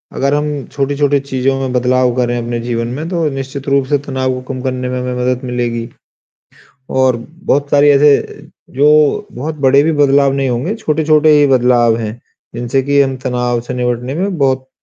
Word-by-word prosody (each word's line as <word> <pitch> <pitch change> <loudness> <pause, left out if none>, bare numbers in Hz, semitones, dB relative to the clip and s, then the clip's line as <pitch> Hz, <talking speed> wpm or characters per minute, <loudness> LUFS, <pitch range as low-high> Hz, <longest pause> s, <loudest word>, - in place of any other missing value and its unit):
अगर 140 +1 0
हम 145 -3 -2
छोटी-छोटी 140 0 0
चीज़ों 135 -1 -1
में 135 -1 -3
बदलाव 125 0 +2
करें 120 -1 0
अपने 120 0 -3
जीवन 115 0 -3
में, 140 +7 -5
तो 170 -3 -1
निश्चित 135 0 -6
रूप 140 -1 +2
से 145 +2 +1
तनाव 130 -2 -3
को 130 - -5
कम 130 - -6
करने 130 -1 -3
में 125 - -3
हमें 125 0 -3
मदद 125 0 -1
मिलेगी। 120 -2 -3 1.0
और 130 -1 +2 0.3
बहुत 145 -6 0
सारे 145 0 +5
ऐसे 140 0 +2 0.3
जो 150 +2 +3
बहुत 150 +6 -5
बड़े 135 +2 +5
भी 160 - +1
बदलाव 140 -2 +3
नहीं 135 -1 -1
होंगे, 125 - -2
छोटे-छोटे 155 -6 +2
ही 145 - +4
बदलाव 120 -3 +3
हैं, 115 +1 -5 0.4
जिनसे 120 +3 -1
कि 140 0 +3
हम 135 -1 0
तनाव 125 -2 -1
से - - -4
निपटने 125 +1 -2
में 185 +1 -2
बहुत 130 -2 0
135 Hz, 180 wpm, -15 LUFS, 125-145 Hz, 1.0 s, सारे